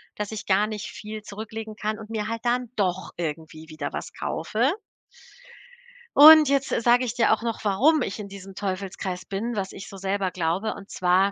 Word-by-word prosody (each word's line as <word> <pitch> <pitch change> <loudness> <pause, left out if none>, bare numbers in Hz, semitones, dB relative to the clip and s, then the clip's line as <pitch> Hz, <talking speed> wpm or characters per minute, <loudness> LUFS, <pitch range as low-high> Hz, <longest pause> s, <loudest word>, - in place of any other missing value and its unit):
dass 210 0 -4
ich 220 -1 -6
gar 200 +2 +3
nicht 215 -1 -5
viel 215 0 -7
zurücklegen 220 +1 -7
kann 215 0 -3
und 220 -1 -10
mir 215 -2 -3
halt 230 0 -4
dann 245 0 0
doch 190 -2 -1
irgendwie 160 -1 -5
wieder 155 -2 -5
was - - -6
kaufe. 230 - -1 1.5
Und 305 0 +10
jetzt 275 -1 +1
sage 245 +2 +4
ich 235 - -3
dir 240 -1 +3
auch 220 - -1
noch, 230 -1 -3
warum 260 +10 +3
ich 205 -3 -3
in 205 - -6
diesem 195 -1 -10
Teufelskreis 190 -1 -4
bin, 225 +5 -3
was 195 -2 -3
ich 195 - -9
so 200 - -10
selber 195 0 -1
glaube. 180 +5 -1
Und 200 0 -12
zwar, 185 +2 +2
210 Hz, 190 wpm, -25 LUFS, 190-225 Hz, 1.5 s, Und